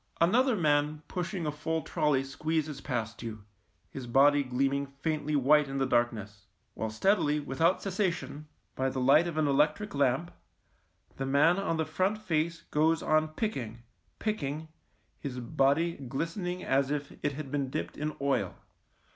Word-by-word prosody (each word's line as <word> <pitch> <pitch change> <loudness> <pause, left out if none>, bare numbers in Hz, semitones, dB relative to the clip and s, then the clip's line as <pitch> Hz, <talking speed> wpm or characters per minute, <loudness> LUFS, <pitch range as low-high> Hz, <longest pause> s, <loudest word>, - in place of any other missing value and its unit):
Another 240 +9 +4
man 150 -3 +1
pushing 180 -1 -3
a 150 - 0
full 160 +2 -2
trolley 150 -5 +1
squeezes 155 +1 -2
past 115 -5 -3
you, 110 -3 -6 0.5
his 130 -3 -7
body 145 +4 +5
gleam 135 +1 0
ing 140 0 -1
faintly 150 +2 -2
white 145 +2 +4
in 135 0 -4
the 135 - +2
darkness, 110 -5 -1 0.3
while 110 - -3
steadily, 150 - +2
without 160 +6 +1
cessation, 180 -6 -2 0.3
by 130 0 0
the 130 - -3
light 140 +6 +5
of 165 -2 -4
an 155 - +3
electric 150 +9 +1
lamp, 140 +4 +1 0.9
the 135 - -2
man 150 +7 +4
on 165 -4 -1
the 160 - 0
front 185 +7 0
face 170 -3 -1
goes 160 +2 +2
on 155 0 +3
picking, 135 - -4 0.3
picking, 160 -7 -3 0.5
his 130 -3 -5
body 140 +7 +2
glistening 165 +7 -4
as 135 0 +2
if 145 -1 -3
it 145 - 0
had 140 -1 -7
been 140 -2 -1
dipped 85 -9 -4
in 155 +1 -3
oil. 140 0 0
150 Hz, 155 wpm, -30 LUFS, 135-165 Hz, 0.9 s, body